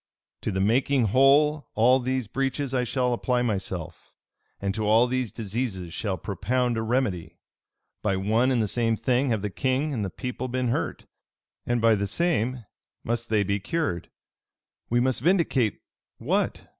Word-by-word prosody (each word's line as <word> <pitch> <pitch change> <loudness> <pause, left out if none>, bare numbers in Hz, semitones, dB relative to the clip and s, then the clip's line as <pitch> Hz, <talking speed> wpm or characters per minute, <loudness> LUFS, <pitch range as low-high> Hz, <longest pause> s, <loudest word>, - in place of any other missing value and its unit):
"To - - -2
the 95 - -2
making 120 +3 +2
whole 145 +5 +4
all 125 +4 +5
these 130 0 -1
breaches 135 +2 -2
I 125 -1 +1
shall 125 0 0
apply 125 +1 0
myself, 95 -7 -4 0.4
and 100 -1 -1
to 110 - -3
all 110 +3 +5
these 125 -2 -2
diseases 100 -5 -4
shall 95 -1 -2
propound 120 +7 -1
a 110 - -1
remedy. 110 -7 -1 0.6
By 100 -2 +1
one 110 +6 +2
and 125 -4 +2
the - - -1
same 115 +1 +1
thing 125 +4 +1
have 110 -4 0
the 105 - -2
king 135 +6 0
and 110 -5 -2
the 95 - -2
people 125 +3 -5
been 125 0 -1
hurt, - - -2 0.6
and 120 0 +1
by 115 0 +5
the 100 -1 0
same 130 - 0 0.4
must 120 +1 -2
they 110 -2 +3
be 100 +1 -1
cured. 105 - -2 0.8
We 120 - +2
must 130 -1 +1
vindicate 150 - +1 0.3
what? - - -1
120 Hz, 165 wpm, -26 LUFS, 105-130 Hz, 0.8 s, all